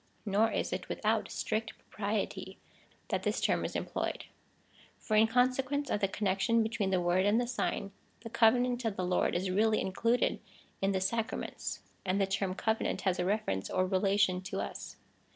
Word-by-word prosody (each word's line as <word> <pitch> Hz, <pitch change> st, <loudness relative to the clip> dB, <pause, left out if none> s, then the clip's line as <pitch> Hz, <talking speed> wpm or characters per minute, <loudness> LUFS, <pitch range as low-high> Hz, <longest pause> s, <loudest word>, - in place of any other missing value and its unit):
Nor 210 Hz, +2 st, +3 dB
is -, -, -1 dB
it -, -, -4 dB
without -, -, 0 dB
strict 220 Hz, 0 st, -2 dB
propriety 200 Hz, -2 st, -3 dB, 0.5 s
that -, -, 0 dB
this -, -, 0 dB
term -, -, +1 dB
is -, -, -4 dB
employed; -, -, -3 dB, 0.7 s
for 215 Hz, -, -2 dB
in 220 Hz, +1 st, +6 dB
consequence 260 Hz, +4 st, +1 dB
of -, -, +1 dB
the 195 Hz, -, +2 dB
connection 205 Hz, +4 st, +1 dB
between 220 Hz, -3 st, -1 dB
the 185 Hz, -1 st, +2 dB
word 175 Hz, +1 st, +2 dB
and 205 Hz, +3 st, +3 dB
the 245 Hz, -, +1 dB
sign, 235 Hz, -4 st, -2 dB, 0.3 s
the 230 Hz, -, -7 dB
covenant 245 Hz, +2 st, +3 dB
of 225 Hz, -3 st, -1 dB
the 185 Hz, -, -2 dB
Lord 180 Hz, -1 st, +1 dB
is 185 Hz, +1 st, 0 dB
really 215 Hz, +3 st, +3 dB
included 230 Hz, +6 st, +1 dB, 0.4 s
in 195 Hz, +1 st, +2 dB
the 190 Hz, -1 st, 0 dB
sacraments, 225 Hz, +5 st, -2 dB, 0.2 s
and 190 Hz, +1 st, 0 dB
the 195 Hz, -, +3 dB
term 195 Hz, -1 st, -1 dB
covenant 220 Hz, -3 st, -1 dB
has 185 Hz, -1 st, 0 dB
a 180 Hz, -, +1 dB
reference 185 Hz, -, -1 dB
or 185 Hz, -, +1 dB
relation 190 Hz, -1 st, +2 dB
to 185 Hz, -, -4 dB
us. -, -, -6 dB
205 Hz, 175 wpm, -31 LUFS, 190-225 Hz, 0.7 s, in